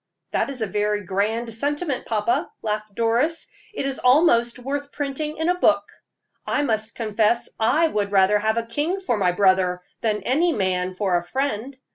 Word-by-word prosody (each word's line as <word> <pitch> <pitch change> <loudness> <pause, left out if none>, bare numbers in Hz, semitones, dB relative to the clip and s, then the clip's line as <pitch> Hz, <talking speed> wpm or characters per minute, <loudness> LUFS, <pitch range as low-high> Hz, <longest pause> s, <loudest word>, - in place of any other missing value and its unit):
"That - - 0
is 255 -5 -3
a - - +1
very 210 0 -1
grand 215 +5 -1
sentiment, 290 +4 -1
papa," 220 +1 0
laughed 215 -1 -3
Doris. 240 +9 +1 0.3
"It 420 - -4
is 275 -1 -2
almost 250 -3 +4
worth 280 +3 -4
printing 295 +2 -4
in 320 +1 -1
a 360 0 +1
book. - - +4 0.6
I 290 - 0
must 220 -4 -1
confess 220 +1 +1
I 295 +9 +3
would 205 -9 -2
rather 200 +1 +4
have 220 +2 0
a 230 - +1
king 295 +11 -1
for 370 -11 -1
my 190 -4 +2
brother 185 -1 +2 0.2
than 215 -2 0
any 325 +7 +2
man 185 -3 -1
for 185 -2 +1
a 175 - -3
friend. 260 +4 -3
230 Hz, 175 wpm, -23 LUFS, 210-280 Hz, 0.6 s, almost